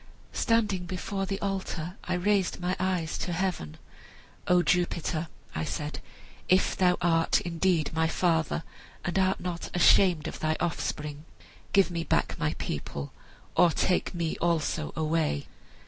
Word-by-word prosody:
"Standing 210 -6 +1
before 195 +2 -3
the 195 0 -2
altar 190 -3 -3
I 180 - 0
raised 190 0 +1
my 180 +1 -1
eyes 180 -4 -1
to 180 - -2
heaven. 165 - -2 0.7
'O 180 0 +5
Jupiter,' 170 0 0 0.3
I 80 - -2
said, 150 - -4 0.5
'if 185 +1 +4
thou 180 -1 +3
art 165 -1 +3
indeed 170 -2 +1
my 160 0 +2
father, 165 -1 +1 0.4
and 175 +2 0
art 190 0 +2
not 175 -2 -4
ashamed 175 -2 +5
of - - -6
thy 155 0 0
offspring, 150 -3 -3 0.5
give 195 -2 +4
me 170 -1 -2
back - - +1
my - - 0
people, 70 0 -5 0.4
or 175 - +6
take 180 +2 0
me 165 -2 -1
also 160 -2 0
away!' 155 - 0
175 Hz, 140 wpm, -28 LUFS, 160-185 Hz, 0.7 s, or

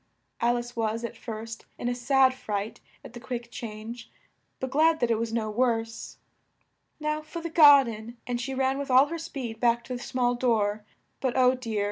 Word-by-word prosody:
Al 240 +1 +2
ice 240 +1 -6
was, 225 0 -1
at 235 - -5
first, 225 0 -7
in - - -4
a 245 - +1
sad 260 +2 +3
fright 210 -4 -4 0.3
at - - -11
the 240 - -8
quick 240 0 -6
change, 230 +1 -7 0.5
but 260 0 -4
glad 315 +3 +4
that 240 -1 +1
it 225 - +1
was 230 -1 -2
no 220 -2 -1
worse. 225 -1 -1 0.8
"Now 305 0 -1
for 310 +2 -7
the 335 0 -5
gar 290 -4 +8
den," 230 0 -7
and 245 -1 -2
she 265 +1 -4
ran 265 +1 +1
with 280 - -4
all 260 +2 +7
her 335 0 -4
speed 245 -8 -6
back 235 0 +2
to 255 - -6
the 245 - -5
small 245 -1 0
door; 215 -4 +1 0.4
but, 260 -1 -1
oh 255 0 +5
dear! 230 -4 -3
240 Hz, 200 wpm, -27 LUFS, 230-265 Hz, 0.8 s, gar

